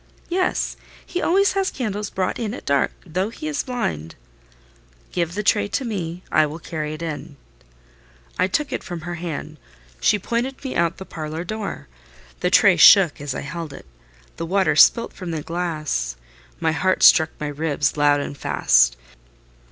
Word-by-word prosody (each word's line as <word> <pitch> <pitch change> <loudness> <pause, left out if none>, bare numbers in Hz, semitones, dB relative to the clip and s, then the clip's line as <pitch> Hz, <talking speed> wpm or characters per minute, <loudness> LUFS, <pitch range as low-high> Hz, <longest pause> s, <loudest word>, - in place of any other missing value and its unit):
"Yes: 365 +1 0 0.3
he 360 - -3
always 395 +3 +3
has 390 -1 +1
candles 210 -5 -3
brought 185 -1 -2
in 225 -1 -3
at - - -10
dark, 140 -1 +2
though 185 +4 -2
he 310 +7 -7
is 300 -1 -1
blind." 80 - -4 1.0
"Give 170 0 -2
the 210 - -2
tray 205 0 +2
to 255 +6 -2
me; 180 -5 -4
I 155 -1 +4
will 150 +2 -7
carry 155 -2 -5
it 160 - -8
in." 155 -3 -6 1.0
I - - +3
took 290 +10 -1
it - - -3
from 175 -2 -6
her 175 +2 -5
hand: 160 -2 -6 0.4
she 210 - +3
pointed 240 +7 -3
me 265 - -4
out 170 0 +1
the 190 - -8
parlour 155 0 -5
door. 215 +2 -5 0.5
The - - +1
tray - - +5
shook 180 -8 +7
as 145 -2 -4
I - - -3
held 165 0 -6
it; - - -11 0.5
the 165 - -3
water 190 +2 +2
spilt 235 - +5
from 180 -2 -7
the 160 -3 -3
glass; 155 - -2 0.4
my 160 - +1
heart 185 +4 +1
struck 160 -2 +7
my 150 - -3
ribs 145 0 -1
loud 145 -1 +3
and 140 - -5
fast. - - +3
170 Hz, 175 wpm, -22 LUFS, 155-210 Hz, 1.0 s, shook